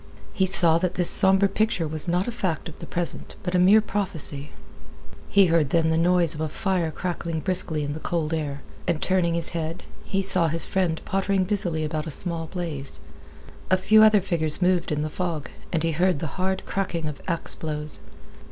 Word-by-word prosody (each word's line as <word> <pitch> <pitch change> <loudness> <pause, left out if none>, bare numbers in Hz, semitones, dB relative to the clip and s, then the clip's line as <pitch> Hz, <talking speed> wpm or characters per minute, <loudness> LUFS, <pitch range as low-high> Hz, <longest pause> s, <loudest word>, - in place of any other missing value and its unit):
He 190 - +1
saw 170 -3 +5
that 180 0 -2
this 175 -1 +5
somber 195 +1 +6
picture 215 -5 -1
was 155 +3 +1
not 180 +4 0
a - - -2
fact 190 -8 -3
of 165 - -11
the - - -8
present, 175 -1 -4
but 180 - -3
a 180 - +3
mere 200 +5 +6
prophecy. 175 -9 -3 0.8
He 200 -1 +5
heard 165 -4 +2
then 160 +1 +2
the - - +1
noise 175 -1 +2
of 155 - -6
a 160 - -2
fire 180 0 -1
crackling 170 -1 -4
briskly 180 -4 -1
in 145 0 -3
the 155 - -6
cold 165 -1 -2
air, 145 -3 -4 0.2
and, 170 -3 0
turning 175 -2 +1
his 170 - 0
head, 165 0 -5 0.2
he 195 0 -2
saw 180 -3 +5
his 165 +1 +4
friend 180 -4 -1
pottering 195 0 0
busily 180 -5 -1
about 155 +1 -3
a - - -3
small 165 +1 -3
blaze. 160 -6 -6 0.7
A 185 - +4
few 215 +3 +4
other 215 -2 +6
figures 160 -4 -1
moved 180 -2 +1
in 150 0 -1
the - - -2
fog, 165 -2 -4 0.2
and 165 -2 -1
he 165 - +1
heard 180 +2 +1
the 160 +5 -5
hard 190 0 -1
cracking 175 -5 -3
of 150 -2 -7
axe 170 -2 -1
blows. 150 -1 -4
170 Hz, 200 wpm, -24 LUFS, 160-185 Hz, 0.8 s, somber